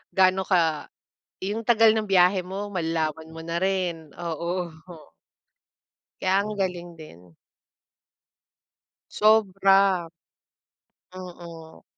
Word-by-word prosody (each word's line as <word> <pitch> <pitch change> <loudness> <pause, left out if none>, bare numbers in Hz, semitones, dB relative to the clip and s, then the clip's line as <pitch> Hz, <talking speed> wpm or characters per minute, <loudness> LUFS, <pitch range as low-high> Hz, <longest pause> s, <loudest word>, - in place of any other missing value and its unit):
gaano 190 0 +3
ka 165 -5 +1 0.5
yung 210 +4 -4
tagal 225 -1 +5
ng 215 - 0
biyahe 185 0 +4
mo, 195 +3 -5
malalaman 160 -3 -3
mo 165 - -9
na 165 +1 -4
rin. 175 -4 -2
Oo. 170 +2 -3 1.5
Kaya 190 +2 +2
ang 215 - -4
galing 180 -3 -4
din 90 - -15 1.8
Sobra. 195 -4 +3 1.1
Mm. 170 -3 -11
180 Hz, 90 wpm, -25 LUFS, 165-195 Hz, 1.8 s, tagal